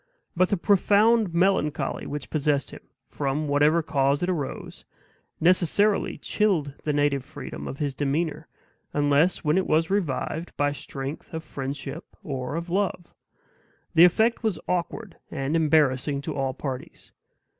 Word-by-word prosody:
But 180 +1 +3
the 200 - +1
profound 205 +2 +3
melancholy 165 -5 0
which 145 -1 -6
possessed 145 -3 0
him, - - -9 0.3
from 145 +2 -2
whatever 150 +3 +3
cause 140 0 +1
it 180 - +1
arose, 150 -7 -5 0.6
necessarily 185 +4 +2
chilled 175 -10 0
the 150 - +1
native 145 -2 +1
freedom 70 +1 -8
of 135 - -6
his 145 -2 -2
demeanor, 145 +4 -2 0.5
unless 145 +4 +2
when 155 +4 +3
it 190 - -2
was 160 +3 +2
revived 170 -2 -2
by 145 +1 +2
strength 140 +2 -6
of 160 - -4
friendship 140 +4 -6
or 135 -4 -4
of 170 +1 -4
love. 185 -2 -1 0.8
The 165 - +7
effect 220 +6 +4
was 215 -7 0
awkward 180 +2 -3
and 135 +4 -2
embarrassing 145 -3 +2
to 150 +1 -5
all 135 -2 -1
parties. 130 -3 -7
155 Hz, 140 wpm, -25 LUFS, 140-180 Hz, 0.8 s, The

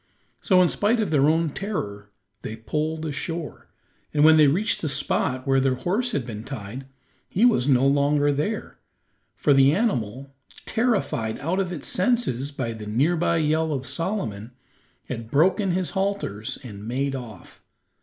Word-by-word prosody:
So, 185 -3 +4
in - - +4
spite 220 +3 +1
of 210 -7 0
their 145 -1 +4
own 160 -1 +1
terror, 105 - -5 0.3
they 110 - -6
poled 155 +7 -3
ashore, 160 +2 -5 0.4
and 150 -1 +2
when 160 0 +8
they 155 -2 +6
reached 185 +11 +1
the 155 - -1
spot 130 -1 -1
where 135 -1 +3
their 130 -1 +2
horse 215 - -1
had 140 - -2
been 110 -3 -6
tied 130 0 -7 0.4
he 215 +6 +3
was 220 - +3
no 135 -2 +4
longer 145 +1 +3
there, 180 +10 -3 0.6
for 145 - +3
the 135 +2 +5
animal, 135 - -2 0.3
terrified 140 - 0
out 170 +7 -1
of 185 -2 -1
its 160 -6 -6
senses 180 - 0
by 130 -5 -3
the 110 -1 -8
near 135 +11 +2
by 170 0 +1
yell 160 0 +1
of 135 -3 -3
Solomon, 130 - -3 0.5
had 115 -3 -6
broken 185 - +3
his 180 0 0
halters 190 - -2
and 105 -3 -9
made 135 +3 -1
off. 115 -8 -10
145 Hz, 165 wpm, -24 LUFS, 125-180 Hz, 0.6 s, when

